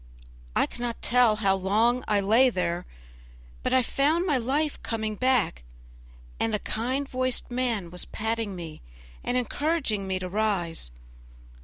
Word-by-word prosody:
I - - +4
cannot 240 -1 -5
tell 240 -3 +4
how 200 -3 +2
long 215 +6 +2
I 205 -1 +3
lay 225 +7 +5
there, 180 -4 -2 0.7
but - - -1
I 260 -1 +4
found 305 +8 +2
my 305 -6 +2
life 280 +5 0
coming 220 -1 -2
back, 250 - +2 0.8
and 225 -1 +1
a 210 - -5
kind 260 +5 -1
voiced 255 -1 -1
man 235 -8 -1
was 180 - -5
patting 220 -2 -2
me 165 -3 -8 0.4
and 245 - 0
encouraging 250 -5 0
me 190 0 0
to 185 0 -4
rise. 180 - -1
225 Hz, 145 wpm, -27 LUFS, 195-255 Hz, 0.8 s, lay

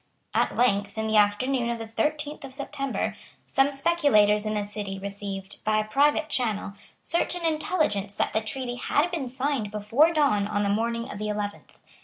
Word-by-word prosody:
At - - +1
length, 205 -4 +2
in 220 - -1
the 220 0 +2
afternoon 235 +4 +2
of 235 - -1
the 225 - -6
thirteenth 295 +7 -2
of 265 -1 -9
September, 275 0 -3 0.3
some 270 +1 +3
speculators 270 -9 +3
in 215 - -1
the 205 -1 -1
City 205 -1 -5
received, 195 0 -6
by 215 0 +2
a 215 - +2
private 290 +6 +3
channel, 215 -7 -1 0.3
certain 340 +1 -1
intelligence 305 - 0
that - - 0
the 220 - +1
treaty 245 +2 -4
had 300 +7 +1
been 315 -7 -2
signed 260 -3 -1
before 215 +10 +3
dawn 280 -11 +2
on 205 -1 0
the 200 - +1
morning 230 +3 0
of 205 - -7
the 210 0 -2
eleventh. 205 -1 -5
225 Hz, 180 wpm, -26 LUFS, 205-280 Hz, 0.3 s, some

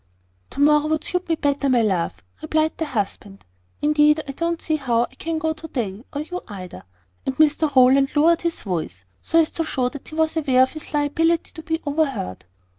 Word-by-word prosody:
"To - - -9
morrow 300 +1 +4
would 310 0 0
suit 360 -1 -3
me 325 - +3
better, 285 -2 0
my 245 -3 +3
love," 185 - -1 0.2
replied 315 0 0
the 325 - 0
husband. 205 - -4 0.4
"Indeed 300 +1 +4
I - - -3
don't 335 +4 -2
see 315 -1 -1
how 240 -5 +1
I - - -7
can 330 0 -3
go 315 0 0
to 315 +1 -10
day, 225 -7 -4
or 290 - -3
you 360 +4 -5
either." 185 -4 -9 0.4
And 265 -1 -3
Mr 305 -1 +3
Rowland 265 +2 +5
lowered 330 +3 +4
his 335 -1 -2
voice, 160 - -4 0.2
so 330 - 0
as 320 - +2
to 330 - -2
show 255 -5 -1
that 285 +1 -10
he 310 - -9
was 320 0 +1
aware 265 -5 +4
of 260 - 0
his 310 - -7
liability 320 +3 +1
to 320 - -9
be 320 0 -2
overheard. 280 - -2
295 Hz, 205 wpm, -22 LUFS, 255-320 Hz, 0.4 s, Rowland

